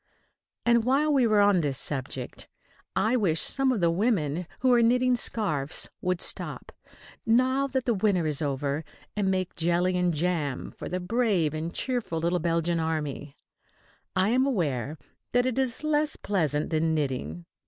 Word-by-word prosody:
And 235 -1 +4
while 280 +5 +2
we 260 -4 +4
are 215 -1 +3
on 200 -3 +4
this 140 -4 -2
subject, 130 -2 -3 0.5
I 220 +5 +2
wish 180 -9 +2
some 270 -1 +2
of 230 -7 -1
the 170 -1 +3
women 175 - 0
who 255 -1 +4
are 240 - +5
knitting 250 +2 +3
scarfs 160 - -2
would 180 -1 -1
stop,[B] - - 0 0.5
now 260 +4 +3
that 250 -6 -1
winter 190 -6 +2
is 150 -1 -1
over, 140 +1 -2 0.3
and 205 -2 0
make 185 -1 -1
jelly 175 +2 +1
and 180 -1 +2
jam 155 -4 -2
for - - -7
the 185 - -2
brave 190 -6 +1
and 160 +2 -3
cheerful 245 -7 -2
little 170 +2 0
Belgian 170 0 0
army. 150 -3 -3 0.8
I 190 +2 +2
am 260 +3 +3
aware 150 - -1 0.4
that 245 0 +3
it 255 0 0
is 260 +1 -1
less 305 0 +1
pleasant 155 -7 -1
than 160 0 +1
knitting. 125 - -3
180 Hz, 160 wpm, -27 LUFS, 155-240 Hz, 0.8 s, are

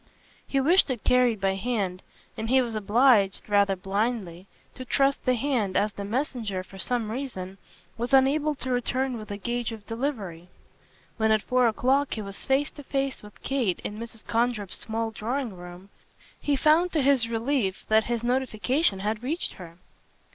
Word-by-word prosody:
He 275 - +1
wished 330 +5 +5
it 250 -5 -3
carried 250 -3 +3
by 195 0 +1
hand, 195 -3 -2 0.3
and 220 +1 -4
he 260 +1 +5
was 240 -3 -1
obliged, 215 -1 +3
rather 200 -1 +3
blindly, 195 -2 -2 0.3
to 255 - -8
trust 275 +2 +1
the 255 - +3
hand, 235 -7 0
as 210 0 +1
the 200 - -6
messenger, 220 -4 -2
for 195 +1 -13
some 230 0 -1
reason, 195 -7 -5 0.4
was 240 +1 -2
unable 285 +3 +4
to 260 -1 -4
return 250 +1 0
with 215 -2 -8
a 205 - -4
gage 240 +3 -2
of 220 -2 -9
delivery. 225 - -4 0.7
When 220 -1 +2
at 215 -1 +3
four 250 -1 +3
o'clock 265 +5 +1
he 220 - -4
was 195 -1 -8
face 275 +2 +1
to 290 - -11
face 275 -1 -2
with 210 -1 -15
Kate 250 -10 0
in 210 +1 -5
Mrs. 230 -1 -9
Condrip's 230 -4 0
small 225 0 -3
drawing 235 0 -3
room 180 +2 -11 0.5
he 290 - +1
found 315 +6 +4
to 305 -4 +2
his 260 -4 +3
relief 230 -4 -1
that 220 0 +4
his 235 -1 -2
notification 250 - +1
had 215 +2 -2
reached 305 +8 -2
her. 170 -1 -11
230 Hz, 175 wpm, -26 LUFS, 205-265 Hz, 0.7 s, wished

